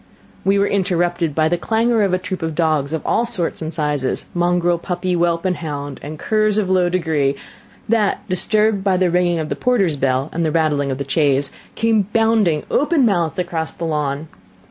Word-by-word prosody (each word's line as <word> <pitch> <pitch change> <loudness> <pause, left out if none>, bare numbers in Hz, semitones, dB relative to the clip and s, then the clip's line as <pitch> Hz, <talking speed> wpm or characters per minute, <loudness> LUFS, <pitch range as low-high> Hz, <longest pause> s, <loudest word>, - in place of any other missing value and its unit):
We 195 +1 +3
were 200 - +3
interrupted 175 -5 0
by 155 -1 +3
the 175 +1 0
clangour 225 +3 +1
of 200 -2 +2
a 185 - +2
troop 185 0 -5
of 160 -1 -3
dogs 155 -4 +1
of 160 -2 -3
all 235 - +2
sorts 180 -10 -2
and 160 0 -4
sizes, 150 -5 -1
"mongrel, 175 0 +1
puppy, 180 +1 -2
whelp, 170 0 +1
and 180 -1 0
hound, 145 -3 -5
and 155 +2 -7
curs 215 +3 +1
of 195 -3 0
low 180 -1 +3
degree," 160 -6 0 0.5
that, 215 -2 0
disturbed 210 +2 +1
by 195 -2 +2
the 180 -1 +2
ringing 175 -1 +2
of 155 -1 -3
the - - -2
porter's 200 - +1
bell, 135 +1 0
and 170 - -1
the 155 - +1
rattling 150 -3 +1
of 130 - -2
the 140 -1 -5
chaise, 140 -1 +1 0.2
came 220 -3 +2
bounding, 220 -9 +2
open 295 -2 +2
mouthed, 175 -7 0
across 175 -3 -2
the 170 - -5
lawn. 150 -1 -2
175 Hz, 195 wpm, -19 LUFS, 155-195 Hz, 0.5 s, We